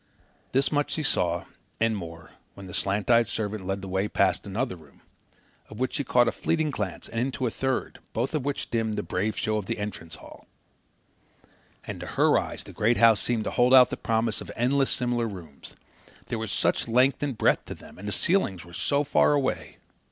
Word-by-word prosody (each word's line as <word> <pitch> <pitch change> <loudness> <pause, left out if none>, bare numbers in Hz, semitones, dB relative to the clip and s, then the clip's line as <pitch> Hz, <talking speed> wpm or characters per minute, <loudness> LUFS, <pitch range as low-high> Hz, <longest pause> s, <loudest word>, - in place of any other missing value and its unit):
This 135 +1 +2
much 145 -1 0
she 155 - -2
saw, 85 -9 0 0.3
and 115 -1 +2
more, 80 -4 -8 0.2
when 100 - -10
the 90 - -9
slant 100 +5 0
eyed 115 -1 +5
servant 105 -4 -3
led 95 0 -2
the - - -5
way 95 +2 0
past 100 0 +1
another 105 +2 -2
room 75 -5 -19 0.7
of 110 - -10
which 130 - -1
she 145 - -1
caught 125 -2 +3
a - - +3
fleeting 160 -2 0
glance 100 -8 -4
and 115 - -4
into 130 +1 -1
a 115 - 0
third, 130 +2 -2
both 120 +7 -2
of 150 -4 0
which 140 0 -3
dimmed 110 -2 0
the 105 - -2
brave 105 +4 -2
show 110 0 0
of 100 -3 -4
the - - -2
entrance 85 -6 -6
hall. - - -14 1.4
And - - -6
to - - -7
her - - +3
eyes - - -6
the - - -12
great 115 +3 +2
house 115 -2 +6
seemed 115 -3 -1
to - - -3
hold 125 +2 +5
out 125 -1 +8
the - - -1
promise 110 -1 -1
of - - -9
endless 135 +3 +2
similar 120 -1 0
rooms. 85 -9 -10 0.5
There 115 - -2
was 110 -2 -3
such - - +1
length 125 +4 +3
and 140 -5 -2
breadth - - +2
to - - -7
them, - - -15
and 100 - -7
the - - -2
ceilings 100 - +1
were 85 - -14
so 140 +10 +1
far 150 +1 +3
away! 110 - -1
110 Hz, 210 wpm, -26 LUFS, 95-130 Hz, 1.4 s, out